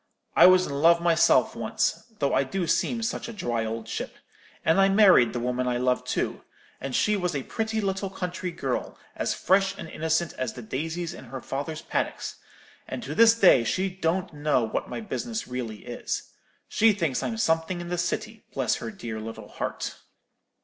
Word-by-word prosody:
I - - +9
was 185 0 +6
in - - -5
love 170 +1 +6
myself 170 -1 +4
once, - - -1
though 140 - 0
I - - +3
do 180 +6 -2
seem 230 +7 0
such 225 - -2
a - - -6
dry 120 - -2
old 110 0 -4
chip; - - -5 0.5
and 165 +4 +4
I 195 - +5
married 195 - +6
the 120 - -3
woman 125 +1 -1
I 125 -1 +1
loved 125 0 0
too; - - -1 0.4
and 135 -1 -4
she 210 - +3
was 180 -5 -1
a 135 - -2
pretty 220 - -2
little 195 -1 -1
country 180 -1 -4
girl, 170 - -3 0.2
as - - -1
fresh 195 +1 +2
and - - -7
innocent 160 +1 -1
as 130 -3 -2
the 125 - -9
daisies 160 +8 -3
in - - -10
her 130 +2 -7
father's 145 +5 -5
paddocks; - - -3 0.5
and - - -5
to - - -4
this 230 0 +6
day 180 - +6
she 185 +11 0
don't 180 0 -1
know 145 -4 +1
what 110 - -3
my - - -4
business 225 +1 -4
really 120 -4 -5
is. - - -4 0.4
She 225 0 +4
thinks 165 -10 -1
I'm 225 - -2
something 165 -3 +1
in 175 0 -6
the 175 - -1
City, 215 +5 -3
bless 130 -4 +1
her 115 - -5
dear 110 -1 -6
little 110 +1 -8
heart!' - - -4
170 Hz, 190 wpm, -26 LUFS, 130-195 Hz, 0.5 s, I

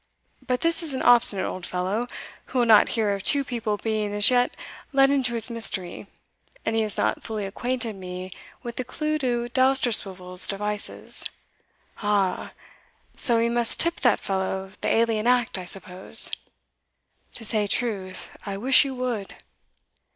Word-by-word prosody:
But 250 -1 -1
this 330 0 +2
is 310 -5 -2
an - - -3
obstinate 235 -5 +5
old 185 - -6
fellow, 190 +7 -2 0.4
who 265 - -6
will 245 - +3
not 220 -2 +6
hear 210 -2 +1
of 200 - -4
two 280 +7 +3
people 230 -5 -3
being 215 -1 -2
as 205 +4 +6
yet 245 0 +1 0.3
let 270 -1 +4
into 255 -4 +1
his 230 +1 +1
mystery, 200 -5 +3 0.6
and 225 - -1
he 225 - +2
has 215 -2 -3
not - - 0
fully 215 -3 -5
acquainted 240 +2 -3
me 185 0 -8 0.3
with 240 -1 -7
the 255 - -2
clew 305 +5 -3
to 240 -3 -1
Dousterswivel's 220 -8 0
devices." 210 +1 -2 0.7
"Aha! 205 -3 -1 0.6
so 240 -4 +3
we 230 +1 +2
must 235 0 +2
tip 335 0 +3
that 245 -5 +2
fellow 190 0 -3
the - - -1
alien 225 -1 +1
act, 245 -5 +1
I 180 - -7
suppose?" 185 0 +1 1.0
"To 225 - -6
say 210 -1 +1
truth, 195 -5 -3
I 200 -1 -5
wish 260 +6 +6
you 270 -2 -5
would." 245 -6 -4
225 Hz, 160 wpm, -24 LUFS, 195-250 Hz, 1.0 s, not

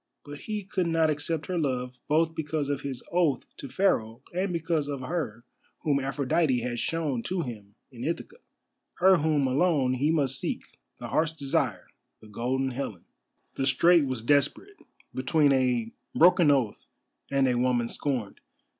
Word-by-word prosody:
But 145 0 -8
he 210 -2 -4
could 185 -2 -1
not 165 -1 +2
accept 150 +1 -2
her 180 -2 -2
love, 125 -4 -2
both 160 +2 +2
because 150 -2 -2
of 140 -1 -1
his 135 -3 -5
oath 165 -8 +1
to 140 - -8
Pharaoh 120 - 0
and 185 +2 -1
because 165 -3 -1
of 140 -2 -4
her 130 -6 -3 0.4
whom 145 -4 +2
Aphrodite 135 0 +1
had 120 0 -3
shown 155 -6 -1
to 180 +6 -2
him 105 -5 -9 0.2
in 120 -2 -8
Ithaca, 170 - -4 0.6
her 190 +1 +5
whom 150 -2 +1
alone 135 -1 +2
he 135 +4 +1
must 140 -5 +1
seek, - - -3 0.3
the - - -7
Heart's 160 0 +1
Desire, 135 - -1 0.3
the - - -16
Golden 130 +5 -1
Helen. 120 -8 -5 0.5
The 135 - -1
strait 165 +4 +5
was 130 -4 -3
desperate, 145 - +1 0.4
between 145 +2 +2
a 125 -4 +1 0.2
broken 175 -1 +6
oath 130 -7 +1 0.4
and 135 -1 +2
a 125 - +2
woman 120 -1 +1
scorned. 125 -6 -3
140 Hz, 160 wpm, -27 LUFS, 125-165 Hz, 0.6 s, broken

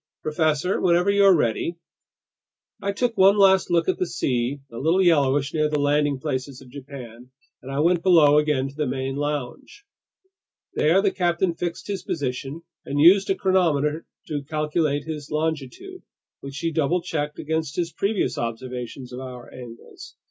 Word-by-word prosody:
"Professor, 155 +3 0
whenever 180 +2 +3
you're 200 -2 +5
ready... 150 +5 -1 0.5
." - - -45
I 200 - -1
took 235 +3 -1
one 195 +1 +5
last 190 -1 +4
look 170 -1 +2
at 185 - 0
the 180 - 0
sea, 125 -1 -1
a 115 - -7
little 165 +6 +2
yellowish 145 -4 +2
near 155 -1 +1
the 150 - 0
landing 145 0 +1
places 135 -2 -4
of 130 -2 -15
Japan, 125 -3 -10 0.3
and 130 - -9
I 140 +2 0
went 175 +1 +2
below 155 -5 +5
again 150 -3 0
to 135 - -10
the 150 -1 -1
main 135 +1 -3
lounge. 145 - -5 0.9
There 175 +6 +3
the 200 - +2
captain 175 -1 0
fixed 170 0 -5
his 200 -3 -4
position 140 -1 -4 0.2
and 145 - -3
used 190 +6 +6
a 195 - +2
chronometer 165 -5 +1 0.2
to 145 -2 -3
calculate 150 0 -1
his 150 -1 -7
longitude, 160 - -4 0.4
which 140 0 -9
he 165 +3 -2
double 160 +3 0
checked 150 -4 -3
against 160 -1 -3
his 170 -1 -2
previous 200 0 -1
observations 125 +2 -6
of 125 - -6
hour 125 -2 -9
angles. 120 -2 -12
150 Hz, 165 wpm, -23 LUFS, 135-175 Hz, 0.9 s, used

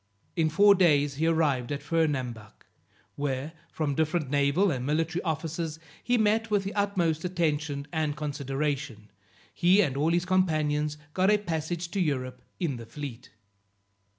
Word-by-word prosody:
In 160 -2 +2
four 200 +6 +6
days 145 -7 +3
he 160 +2 +1
arrived 150 -7 +1
at 145 - -3
Fernambuc, 130 -10 -2 0.5
where, 140 +1 -3 0.2
from 150 -3 -1
different 155 -1 0
naval 145 +7 +3
and 130 -4 -2
military 165 +5 0
officers, 160 -1 -3 0.3
he 245 0 +2
met 220 +1 +2
with 205 -2 +2
the 195 - -4
utmost 180 -6 0
attention 150 -5 -1
and 155 -2 -1
consideration; 140 -6 -3 0.4
he 180 +3 +4
and 145 -10 +2
all 150 +3 +1
his 175 +1 +1
companions 155 -5 +1 0.2
got 185 +1 +3
a 210 - +5
passage 170 -2 -3
to 200 - -2
Europe 130 -6 -1 0.2
in 150 -8 -1
the 115 -1 -9
fleet. 130 -4 -8
155 Hz, 150 wpm, -28 LUFS, 140-175 Hz, 0.5 s, four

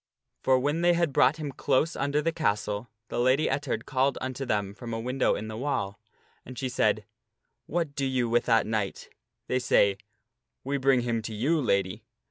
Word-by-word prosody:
For 130 -1 +4
when 145 +5 0
they 175 0 +5
had 170 -4 +1
brought 130 +5 +4
him 150 -3 -4
close 150 +4 +1
under 145 +2 0
the 165 - +1
castle, 105 -7 -1 0.2
the - - -2
Lady 130 +5 +3
Ettard 145 -2 -2
called 135 0 +1
unto 130 +1 -4
them 100 -4 -1
from 115 +3 -6
a - - -3
window 125 +3 +1
in 110 - -5
the 110 - -6
wall. 110 -6 -2 0.4
And 130 0 -10
she 130 +1 -2
said, 110 -3 +1 0.6
"What 165 -3 -1
do 140 -1 -1
you 130 -2 0
with 120 +1 +2
that 115 -2 +3
knight?" 105 -3 -3 0.4
They 130 - 0
say, 100 -5 +3 0.3
" 115 +1 -57
We 140 +2 -1
bring 130 -1 +4
him 120 -1 -1
to 110 0 -6
you, 150 +9 +1
Lady." 100 -6 0
130 Hz, 195 wpm, -28 LUFS, 110-140 Hz, 0.6 s, they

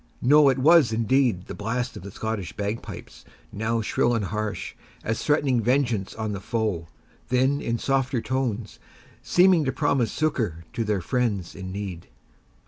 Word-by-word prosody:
No, 145 +2 +6
it 130 - +1
was, 150 -1 +5
indeed, 115 -3 +1
the - - -7
blast 125 +4 -3
of - - -8
the 100 - -8
Scottish 105 -3 -4
bagpipes, 105 +2 -5 0.3
now 110 +2 -1
shrill 120 +2 +1
and 110 -3 -1
harsh, 105 +2 -3 0.3
as 115 +1 -2
threatening 145 -5 +2
vengeance 120 -5 0
on 110 -1 -3
the 100 - -4
foe, 105 -7 -2 0.4
then 130 +3 +2
in 115 0 -1
softer 135 0 0
tones, 120 -4 -3 0.4
seeming 180 -2 +4
to 130 - 0
promise 135 -7 +1
succour 110 - -1
to 115 - -1
their 105 -3 0
friends 105 -4 -1
in 95 -1 -7
need. 95 -3 -6
115 Hz, 155 wpm, -25 LUFS, 105-130 Hz, 0.4 s, No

